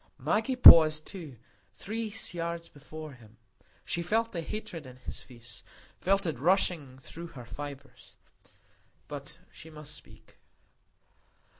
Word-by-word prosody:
Maggie 225 +5 0
paused 155 -10 +9
too, 160 - -9 0.4
three 220 - -4 0.2
yards 170 -1 -4
before 155 +1 -10
him. 115 -3 -18 0.5
She 170 - -2
felt 225 +6 0
the 170 - -3
hatred 165 -5 -6
in 125 - -11
his 125 - -7
face, 115 -3 -11 0.4
felt 195 +1 +2
it 155 -8 -2
rushing 160 -5 +2
through 165 +6 -9
her 125 -7 -11
fibres; 140 +2 -9 0.9
but - - -8
she 160 - -13
must 150 -1 -10
speak. 140 - -14
155 Hz, 125 wpm, -30 LUFS, 135-180 Hz, 0.9 s, paused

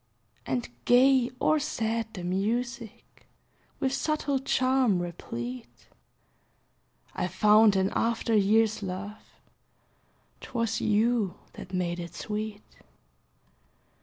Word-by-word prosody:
And 130 -3 -1 0.2
gay 255 0 +5
or 310 - +3
sad 225 -6 -2
the 180 - -6
music, 225 +5 -3 0.5
With 265 0 0
subtle 295 -2 0
charm 255 -6 +2
replete; 120 -8 -7 1.2
I 180 - -2
found 210 +3 +5
in 190 +1 +1
after 230 0 0
years, 215 +1 +3
love 195 +2 -6 1.2
'Twas 230 -3 -2
you 215 -2 +1 0.2
that 185 - -10
made 180 -2 -2
it 170 -1 -7
sweet. 210 0 -5
215 Hz, 95 wpm, -28 LUFS, 185-240 Hz, 1.2 s, gay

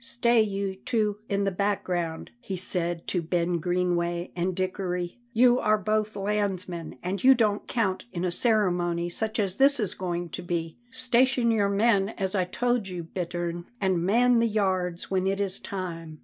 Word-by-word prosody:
"Stay 235 0 +3
you 195 -2 -2
two 210 0 -1
in 200 -1 +1
the 195 - +1
background," 180 -4 -2
he 195 -6 -5
said 175 -2 -2
to 180 - 0
Ben 170 +1 0
Greenway 175 0 -1
and 180 +1 -1
Dickory; 185 0 -3
"you 245 +1 +5
are 215 0 +3
both 215 +1 -1
landsmen, 195 -6 -2
and 185 +1 -3
you 265 +1 +8
don't 215 -3 +1
count 205 -6 -1
in 175 0 -3
a 180 - 0
ceremony 175 -5 +2
such 220 +5 -2
as 195 -2 0
this 275 0 +4
is 210 -5 0
going 175 -1 -3
to - - -6
be. 170 -2 -3
Station 255 -1 +3
your 205 -3 +2
men 200 -1 +3
as 190 -1 -1
I 185 -3 +1
told 240 +3 0
you, 180 -2 -5
Bittern, 175 0 -4
and 190 -4 +1
man 240 +5 +4
the 230 - +3
yards 185 -5 -1
when 190 0 +1
it 195 +1 0
is 195 -2 -1
time." 165 -5 -6
190 Hz, 175 wpm, -27 LUFS, 175-215 Hz, -, you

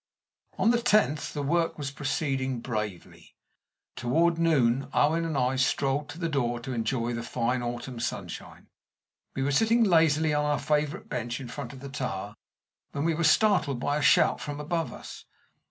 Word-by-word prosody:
On 225 - +4
the 240 0 +1
tenth 210 -11 +2
the 145 - -4
work 165 +3 0
was 140 -3 -4
proceeding 135 -2 -2
bravely. 105 -7 -6 0.6
Toward 165 +7 +1
noon 135 -6 +2
Owen 165 +3 +2
and 160 -3 -2
I 130 0 +1
strolled 135 +2 0
to - - -8
the 170 -1 -2
door 120 -6 -1
to 130 +2 -5
enjoy 120 +1 -1
the 115 - -3
fine 120 +1 -1
autumn 120 +1 -5
sunshine. 120 - -6 0.7
We 135 - -1
were 140 - 0
sitting 225 +10 +3
lazily 160 -5 +3
on 150 0 +1
our 150 0 +1
favorite 150 -1 -1
bench 120 +1 -3
in 130 -3 -8
front 125 -1 -6
of 135 - -11
the 140 - -7
tower 105 -7 -4 0.6
when 140 - -2
we 165 - +2
were 170 +2 -1
startled 160 - +3
by 145 +3 0
a - - -1
shout - - +4
from 145 0 -5
above 165 +2 -2
us. - - -10
140 Hz, 175 wpm, -27 LUFS, 125-160 Hz, 0.7 s, On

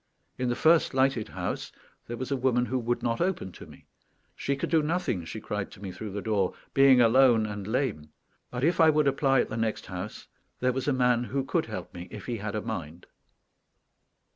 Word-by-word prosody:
In 125 -1 0
the 120 - 0
first 160 +1 +3
lighted 130 -4 +2
house 90 -1 -4 0.4
there 120 - -5
was 130 +3 -5
a - - +2
woman 125 -1 +1
who 130 +1 -1
would 120 0 -2
not 115 +3 0
open 175 - -1
to - - -12
me. - - -16 0.5
She 140 - -1
could - - -4
do 165 -2 +4
nothing, 150 - -1
she 110 - -6
cried 105 -1 -4
to - - -14
me 95 -2 -6
through 110 +3 -7
the 100 - -4
door, 100 -4 0 0.2
being 135 -2 +6
alone 120 -1 +5
and 105 -2 -5
lame; 110 - -1 0.4
but 125 +1 -4
if 170 +3 +2
I 160 - +7
would 150 -2 +3
apply 135 -1 +3
at - - -3
the 110 - -4
next 110 -1 -1
house 90 +3 -7 0.3
there 125 0 +1
was 130 +2 -3
a - - +3
man 125 -2 +2
who 135 +2 -2
could - - -1
help - - -6
me 90 +1 -8
if 105 -2 -9
he 120 -2 -3
had 105 0 -4
a 105 - -1
mind. 85 -7 -6
120 Hz, 215 wpm, -28 LUFS, 105-135 Hz, 0.5 s, I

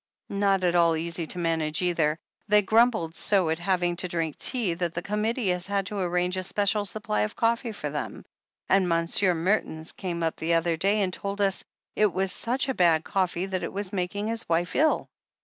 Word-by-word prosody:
"Not 200 -1 +1
at 175 -1 +2
all 170 -2 +4
easy 165 0 -2
to 180 - -4
manage, 165 -1 0
either. 160 -3 +1 0.3
They 210 0 +5
grumbled 220 -6 +3
so 185 -3 +1
at 160 - -1
having 175 -1 0
to 185 - 0
drink 165 -3 -2
tea, 235 -9 0
that 170 0 -3
the 170 - -3
Committee 210 +2 -1
has 180 0 -1
had 200 -1 0
to 200 +2 -4
arrange 180 0 0
a 185 - -2
special 205 +2 0
supply 195 - -2
of 105 - -2
coffee 230 +1 0
for 150 -9 -5
them 150 - -5 0.2
— - - -67
^and 190 -1 +4
Monsieur 170 +2 +2
Mertens 165 -2 -1
came 170 -3 -4
up 160 - -1
the 165 +1 +1
other 165 0 +1
day 200 +5 +1
and 185 -1 -2
told 200 +1 -4
us 195 -2 +2 0.3
it 210 -2 +3
was 190 +1 +1
such 260 +3 -1
bad 165 -3 +3
coffee 185 -2 -1
that 190 -1 -3
it - - -3
was 200 0 -2
making 195 +2 -2
his 225 -2 -3
wife 170 +1 0
ill. 310 +2 +2
185 Hz, 205 wpm, -26 LUFS, 170-205 Hz, 0.3 s, They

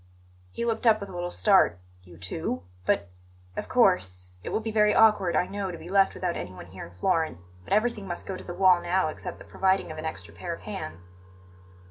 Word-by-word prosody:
He 235 - -3
looked 230 +1 0
up 215 -1 +6
with 200 -1 -7
a - - -9
little 175 0 -3
start. 190 - +4 0.3
"You 90 -2 -14
too? 85 -1 -3 0.2
But 100 -2 +1 0.2
" 90 0 -28
"Of - - -5
course. 90 0 +2
It - - -4
will - - 0
be 225 0 -4
very 210 -1 +4
awkward, 210 -5 +5
I - - +3
know, 200 0 -3
to 175 - -6
be 170 - -10
left 195 0 +4
without 180 -2 -2
anyone 90 -1 -7
here 90 +2 -9
in 85 - -18
Florence; 160 - 0
but - - -14
everything 215 -2 +1
must 175 - -5
go 190 - -4
to - - -9
the 175 - -7
wall 185 -1 +5
now 180 -2 +1
except - - -6
the - - -13
providing 190 -3 +1
of 155 - -7
an 155 - -5
extra 95 - -6
pair - - -4
of - - -16
hands." 85 +3 -7
175 Hz, 225 wpm, -27 LUFS, -, 0.3 s, up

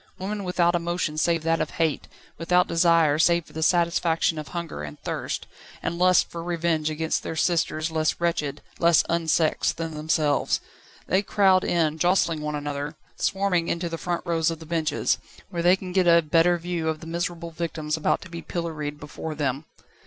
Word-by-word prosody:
Women 200 +2 -4
without 175 -1 +2
emotion 175 -2 -1
save 165 0 +1
that 165 0 +1
of - - -1
hate, 160 -3 0 0.3
without 180 +2 +3
desire, 165 -3 +3
save 170 0 +3
for - - -18
the 160 - -4
satisfaction 170 -1 +2
of 150 - -7
hunger 170 - -5
and 75 0 -8
thirst, - - -3 0.4
and 170 - -2
lust 185 0 +4
for 170 - -5
revenge 170 -2 0
against 160 +1 -1
their - - -5
sisters 160 -1 0
less 155 -1 0
wretched, 150 -4 -1 0.2
less 170 -1 +5
unsexed 165 -1 +1
than 165 -1 -4
themselves. 150 -1 +1 0.5
They 190 +2 +2
crowd 195 -3 +3
in, 160 -2 +1
jostling 175 -3 +2
one 150 0 -3
another, 145 +1 -4 0.2
swarming 190 -4 +1
into 170 0 -1
the 165 0 -5
front 175 -1 -3
rows 165 -2 +1
of 165 - -3
the 160 - -11
benches, 160 -2 0 0.3
where 170 -3 -2
they 175 +2 +5
can 190 -1 -8
get 185 -1 +2
a 170 0 +6
better 165 +3 +3
view 170 -1 -2
of 155 -1 -2
the - - -9
miserable 170 0 -3
victims 160 -2 -3
about 160 - 0
to 185 - -11
be 170 0 -7
pilloried 155 -4 -4
before 150 +1 -6
them. 140 0 -2
165 Hz, 180 wpm, -25 LUFS, 155-175 Hz, 0.5 s, a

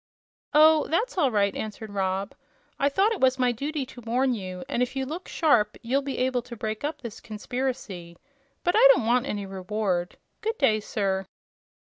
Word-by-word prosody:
"Oh, 310 0 +6
that's 435 +11 0
all 310 -8 +3
right," 200 -3 +1
answered 220 0 -6
Rob. 195 0 -1 0.5
"I 280 - +3
thought 390 +9 +2
it 450 - -3
was 260 0 +4
my 250 -1 +2
duty 280 +4 -3
to 250 -1 -12
warn 250 +3 +1
you, 185 -4 -5
and 240 - -1
if 250 +2 -1
you 265 0 -1
look 325 +7 -6
sharp 235 -10 +2
you'll 260 +4 +1
be 275 -1 -4
able 255 -1 +1
to 240 0 -10
break 215 +2 -4
up 295 0 -3
this 235 -4 -7
conspiracy. 210 -6 -5 0.5
But 350 - +2
I 475 +3 +8
don't - - -1
want 245 +3 +2
any 205 -4 -3
reward. 190 -2 -2 0.2
Good 445 +1 -2
day, 220 -6 +3
sir." 195 -2 -2
245 Hz, 190 wpm, -26 LUFS, 205-280 Hz, 0.5 s, I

